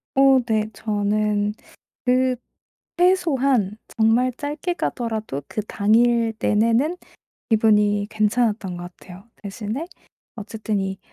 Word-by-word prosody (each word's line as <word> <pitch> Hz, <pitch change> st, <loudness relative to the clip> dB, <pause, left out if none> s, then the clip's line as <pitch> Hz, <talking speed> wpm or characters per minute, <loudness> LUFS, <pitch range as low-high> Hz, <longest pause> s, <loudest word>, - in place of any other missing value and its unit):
어 270 Hz, -1 st, +6 dB
네. 215 Hz, -2 st, 0 dB
저는 210 Hz, 0 st, 0 dB, 0.5 s
그 255 Hz, 0 st, +2 dB, 0.6 s
최소한 275 Hz, -, +2 dB, 0.2 s
정말 230 Hz, +3 st, +3 dB
짧게 300 Hz, +4 st, -3 dB
가더라도 220 Hz, -, -3 dB
그 215 Hz, -, -3 dB
당일 230 Hz, +2 st, +2 dB
내내는 230 Hz, +10 st, +2 dB, 0.5 s
기분이 210 Hz, -2 st, +3 dB
괜찮았던 215 Hz, -3 st, 0 dB
것 175 Hz, 0 st, -8 dB
같아요. 190 Hz, +6 st, -14 dB
대신에 215 Hz, -, -5 dB, 0.5 s
어쨌든 215 Hz, -1 st, -3 dB
이 190 Hz, 0 st, -3 dB
220 Hz, 215 characters per minute, -22 LUFS, 205-250 Hz, 0.6 s, 어